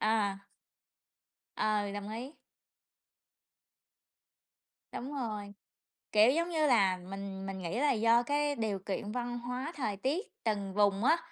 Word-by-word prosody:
À. 200 -2 +1 1.1
Ừ, 210 -2 +1
đồng 205 0 -5
ý. 250 +7 -6 2.6
Đúng 275 +4 -5
rồi, 210 -5 -4 0.6
kiểu, 215 +4 +6
giống 335 +3 +1
như 315 -2 +2
là 195 -7 +4
mình 195 +1 -6
mình 195 0 -4
nghĩ 175 +8 -2
là 295 - +4
do 230 +1 +4
cái 290 +2 +1
điều 215 -4 -1
kiện 205 +2 -4
văn 240 0 -3
hóa 250 +6 -4
thời 215 -8 -2
tiết 290 - -1 0.2
từng 200 -3 -1
vùng 205 0 +3
á, 320 +5 +5
220 Hz, 135 wpm, -32 LUFS, 200-255 Hz, 2.6 s, kiểu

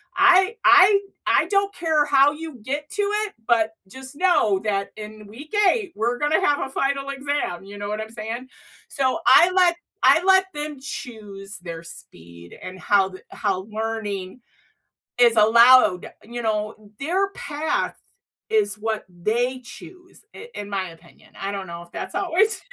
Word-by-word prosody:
I 375 +4 +5
I 390 +2 +7 0.3
I - - +3
don't 400 +1 +1
care 320 -3 +1
how 280 0 +4
you 315 0 -8
get 290 +5 -4
to 410 - -1 0.2
it, 415 - -9
but 225 -2 +2 0.2
just 260 +5 -11
know 305 - +2
that 200 -1 -2
in 215 0 -10
week 275 - -12 0.2
8, 420 -7 -3
we're 235 +3 -1
gonna 295 +3 +2
have 290 -6 +1
a - - -8
final 275 +1 -2
exam," 275 -10 -3
you 200 +1 -10
know 205 0 -5
what 210 +1 -3
I'm 220 - -7
saying? 230 +3 -6 0.4
So, 265 -2 0
I 345 +7 +7
let 365 -2 +3 0.3
I 325 - +5
let 380 0 +4
them 295 -1 -6
choose 210 -7 -8
their 170 -2 -8
speed 85 - -13
and 185 0 -9
how 195 0 +2
the 185 0 -12
how 195 -3 -2
learning 215 -1 -4 0.8
is 240 -1 +5
allowed, 225 -3 +5
you 240 +2 -7
know? 215 -1 -3
Their 365 +8 0
path 305 -3 -3 0.5
is 210 -1 0
what 220 0 -3
they 230 +9 -2
choose, 360 - -14
i 470 - -10
in 205 0 -7
my 190 -3 -3
opinion. 165 +1 -19
I 195 +1 -4
don't 195 -1 -5
know 170 -1 -8
if 175 0 -17
that's - - -6
always 390 +5 +1
235 Hz, 165 wpm, -22 LUFS, 205-300 Hz, 0.8 s, I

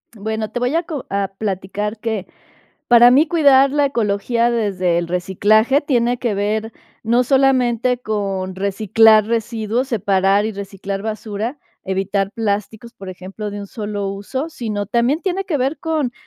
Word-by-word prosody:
Bueno, 220 +1 -3
te 245 - -3
voy 250 +3 0
a 335 - +1
co 310 -6 -6
a 200 0 0
platicar 205 +1 -3
que, 220 -4 -3 0.6
para 240 0 +7
mí 285 +6 +5
cuidar 280 -5 +5
la 290 0 +2
ecología 235 -1 0
desde 190 -7 0
el 170 -1 -3
reciclaje 205 +9 +2
tiene 245 -4 0
que 235 -4 -1
ver 215 +2 -2 0.3
no 235 +3 +2
solamente 250 -2 +2
con 195 -5 -3
reciclar 215 +2 +4
residuos, 230 +2 -1
separar 195 -3 +2
y 220 - -3
reciclar 195 0 -6
basura, 220 +4 -4 0.3
evitar 195 +1 -1
plásticos, 220 +1 -3
por 195 - -11
ejemplo, 190 +3 -7
de 205 0 -6
un 200 - -7
solo 205 -2 -4
uso, 205 +10 -4
sino 215 -9 -4
también 240 - +1
tiene 385 +1 -2
que 340 -5 -1
ver 270 +4 -1
con 310 -6 -1
220 Hz, 155 wpm, -19 LUFS, 200-245 Hz, 0.6 s, para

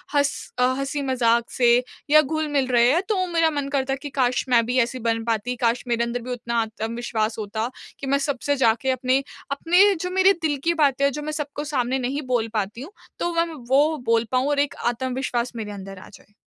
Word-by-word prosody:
हँस 285 -1 +3 0.3
अ, - - +4 0.2
हँसी-मज़ाक 260 -4 0
से 240 -2 +4 0.3
या 305 +1 +7
घुल-मिल 295 -2 -1
रहे 240 -1 +4
हैं 335 +5 +2
तो 380 -4 +1
मेरा 330 -1 +4
मन 285 -2 -3
करता 270 -1 0
है - - -2
कि 290 - -6
काश 250 -1 +2
मैं 235 -2 +4
भी 245 +2 -1
ऐसी 250 +1 0
बन 230 0 0
पाती 230 +2 -1
काश 230 +1 +1
मेरे 235 -1 +1
अंदर 235 +1 -3
भी 250 +2 -6
उतना 235 -1 -2
आत्मविश्वास 225 0 -3
होता 220 +2 -3 0.3
कि 275 - -5
मैं 280 +1 +3
सबसे 285 +1 0
जाके 240 0 +2
अपने 260 +1 +1 0.3
अपने 355 +8 +4
जो 360 +2 -4
मेरे 380 +1 +5
दिल 300 -3 0
की 340 - +2
बातें 275 -1 +3
हैं 280 - +3
जो 295 +3 -5
मैं 305 +1 -4
सबको 290 0 -5
सामने 255 0 0
नहीं 260 +4 -2
बोल 240 -3 +1
पाती 215 +2 -2
हूँ, 310 - -9 0.3
तो - - 0
वो 335 0 +2
मैं 335 - -8 0.2
वो 295 +4 +3
बोल 230 0 +2
पाऊँ 255 +1 +1
और 290 -1 +1
एक 285 0 0
आत्मविश्वास 250 0 -1
मेरे 215 -2 -5
अंदर 195 -1 -8
आ - - -13
जाए। 205 - -18
255 Hz, 220 wpm, -23 LUFS, 235-285 Hz, 0.3 s, या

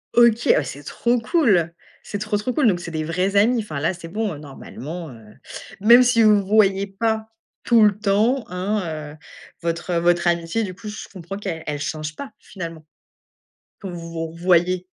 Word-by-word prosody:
OK. 235 -1 +5
Oh - - +1
ouais, 150 - +5
c'est 140 +2 -8
trop 240 - 0
cool! 225 - +2 0.3
C'est 205 - -5
trop, 215 0 -1
trop 215 +5 -2
cool! 290 -3 +3
Donc, 185 -5 +2
c'est 175 -1 -7
des 155 -1 -2
vrais 180 +5 -1
amis, 230 +5 +4
enfin, 155 -9 -5
là, 155 +5 0
c'est 170 -2 -10
bon, 210 +2 -2
heu, - - -8
normalement, 150 +3 -8
heu, 110 -3 -15 0.5
même 235 +4 +8
si 240 -2 +4
vous 210 -1 +6
vous 190 - -10
voyez 200 -2 +3
pas 220 +2 -2 0.4
tout 230 -2 +5
le 210 -2 +4
temps, 220 +5 +1
hein, 190 +4 -1 0.3
heu, - - -15 0.4
votre 170 +1 -2
votre 175 +1 +2
amitié 170 +6 0
du 190 -3 -5
coup 205 +4 -11
je 210 +1 -7
comprends 190 +1 -7
qu'elle 180 -6 -5
elle 150 -1 -3
change 155 +1 -4
pas 275 - -8
finalement 165 -4 -8 0.9
quand 195 -3 -7
vous 175 - -7
vous 165 0 -3
revoyez? 175 +2 +1
190 Hz, 195 wpm, -22 LUFS, 165-215 Hz, 0.9 s, même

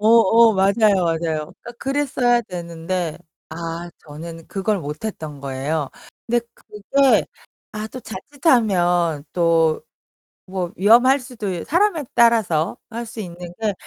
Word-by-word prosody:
어 215 - 0
어 230 0 +6
맞아요, 200 0 +3
맞아요. 165 -1 +1
그러니까 160 +7 -5
그랬어야 265 -3 +1
되는데 170 -2 -4 0.3
아 165 +1 -5 0.2
저는 165 +2 -9
그걸 200 +1 -1
못했던 150 -2 -6
거예요. 140 +2 -3 0.4
근데 240 0 +1
그게 260 +6 +1 0.5
아 215 0 -4
또 255 - -8
자칫하면 185 - +1
또 165 -2 +2 0.6
뭐 185 -2 -3
위험할 245 +7 +5
수도 235 -5 -6
있 175 -3 -4
사람에 345 -2 +2
따라서 220 -9 +3
할 235 +1 -5
수 220 - -8
있는 175 -2 -8
게 215 - +1
190 Hz, 255 characters per minute, -21 LUFS, 165-230 Hz, 0.6 s, 어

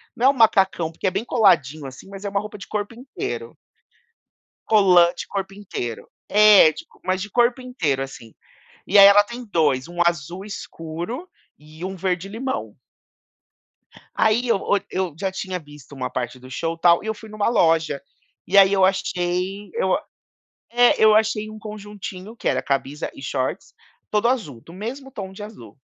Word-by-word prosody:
não 250 +2 +3
é - - +8
um - - +3
macacão, 195 - +3
porque 165 - -3
é - - +1
bem 195 +5 -3
coladinho 155 - +2
assim, 135 +8 -10
mas 200 +1 -9
é 200 - -1
uma 200 0 0
roupa 210 0 -8
de 200 - -10
corpo 210 +1 -3
inteiro. 365 - -6 1.1
Colante 180 -5 +5
de - - -17
corpo 195 -1 -4
inteiro. 150 - -6 0.2
É 210 -5 +7
de - - -10
co - - -25
mas 185 +1 -1
de 210 - -5
corpo 240 +4 +2
inteiro, 170 - -1
assim, 120 -4 -8 0.5
e 200 - +4
aí 200 - +11
ela 200 +1 +8
tem 240 +3 -8
2, 150 -9 +1
1 175 0 -9
azul 170 +3 -1
escuro 200 - -6 0.3
e 155 +3 -13
1 190 +1 -4
verde 185 +1 -2
limão. 260 +5 -4 1.4
Aí 220 +3 +2
eu 230 - +3
o 200 - +1
eu 185 -3 -2
já 190 0 -1
tinha 185 -1 -4
visto 145 -2 -15
uma 135 - -4
parte 125 0 -4
do 130 +1 -13
show, 165 +5 -3
tal, 170 0 +4
e - - -7
eu 220 - 0
fui 220 0 -13
numa 215 0 0
loja, 165 -9 +2 0.5
e 200 - +2
aí 195 -1 +8
eu 190 -1 +5
achei 185 +1 -1
eu 480 - +1
a - - -4 0.7
é, 240 -1 +4
eu 215 -1 +7
achei 215 0 +1
um 215 - -9
conjuntinho 210 -1 -8
que - - -11
era - - +1
camisa 140 +1 -2
e - - -11
shorts 135 +6 -3 0.4
todo 210 +2 +2
azul, 185 - -2
do 165 - -15
mesmo 245 +9 -7
tom 195 -7 -7
de 195 - -10
azul. 130 - -11
195 Hz, 185 wpm, -22 LUFS, 165-215 Hz, 1.4 s, aí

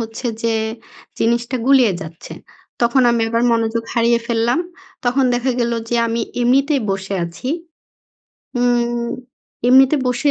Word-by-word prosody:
হচ্ছে 225 +2 -5 0.2
যে 230 -1 +1 0.6
জিনিসটা 235 +2 0
গুলিয়ে 260 -6 +5
যাচ্ছে। 160 +1 -9 0.5
তখন 235 +2 +3
আমি 235 -1 +1
আবার 230 +1 +1
মনোযোগ 230 0 0
হারিয়ে 235 0 +3
ফেললাম। 235 +4 +1 0.5
তখন 255 +2 +2
দেখা 245 +2 0
গেলো 235 0 0
যে 240 - 0
আমি 230 +1 -1 0.2
এমনিতেই 275 +4 +2
বসে 195 0 -3
আছি। 170 +9 -7 1.1
উম 240 -1 +1 0.6
এমনিতে 265 +3 +6
বসে 250 +4 +1
235 Hz, 130 wpm, -19 LUFS, 230-250 Hz, 1.1 s, এমনিতে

